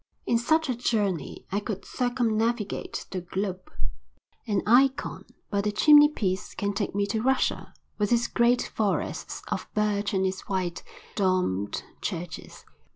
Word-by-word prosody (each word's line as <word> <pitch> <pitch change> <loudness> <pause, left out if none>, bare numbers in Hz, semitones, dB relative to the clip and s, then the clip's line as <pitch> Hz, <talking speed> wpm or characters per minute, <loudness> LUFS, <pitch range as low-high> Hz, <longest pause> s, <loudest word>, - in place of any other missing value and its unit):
In 235 - +2
such 315 +6 +2
a 255 - +1
journey 205 - -1
I 200 - +1
could 205 -1 -5
circumnavigate 235 -3 -1
the 185 - -3
globe. 185 +1 -4 0.8
An 205 -2 +1
eikon 265 +4 +3 0.3
by 200 -1 +2
the 210 +1 0
chimneypiece 295 -7 +4
can 200 0 -1
take 200 0 -2
me 200 0 +2
to 215 +2 -1
Russia 265 +2 +1 0.3
with 205 +1 +1
its 240 0 +3
great 240 +1 +3
forests 210 -3 -2
of - - -3
birch 210 -1 +1
and 190 0 +2
its 190 +1 -3
white, 185 -3 -1 0.3
domed 180 - 0 0.2
churches. 175 -3 -5
205 Hz, 140 wpm, -27 LUFS, 190-235 Hz, 0.8 s, chimneypiece